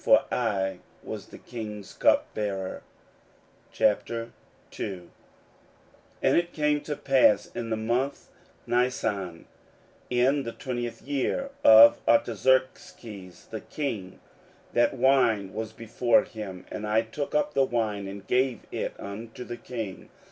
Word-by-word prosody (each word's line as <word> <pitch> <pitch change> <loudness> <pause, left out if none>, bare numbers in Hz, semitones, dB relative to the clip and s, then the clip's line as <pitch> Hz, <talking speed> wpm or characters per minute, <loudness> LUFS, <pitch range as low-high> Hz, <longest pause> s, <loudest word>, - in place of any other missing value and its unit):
For - - +6
I 95 -6 0 0.2
was - - -7
the - - -12
king's 105 -4 -7
cupbearer. 100 -3 0 0.9
16:002:001 110 -5 -3 1.1
And - - +4
it 175 0 +1
came 150 -2 +1
to 150 0 -4
pass 135 -7 +4
in 115 - -4
the 110 - 0
month 120 +5 -1 0.4
Nisan, 105 -8 -1 0.6
in 130 +4 +3
the 115 -3 -5
twentieth 120 -2 -5
year 145 - -1
of 115 +1 +9
Artaxerxes 115 -4 0
the - - -5
king, 110 -11 -5 0.5
that 120 - +3
wine 120 -7 +3
was 110 0 -4
before 115 +2 +2
him: 95 -4 -8
and 105 - -4
I 110 +2 +3
took 140 +7 -5
up 150 0 +1
the 135 - +4
wine, 110 -6 -1
and 100 0 -8
gave 125 -3 +1
it - - -4
unto 110 +4 -7
the 120 -1 -7
king. 110 -8 -6
115 Hz, 120 wpm, -27 LUFS, 105-130 Hz, 1.1 s, of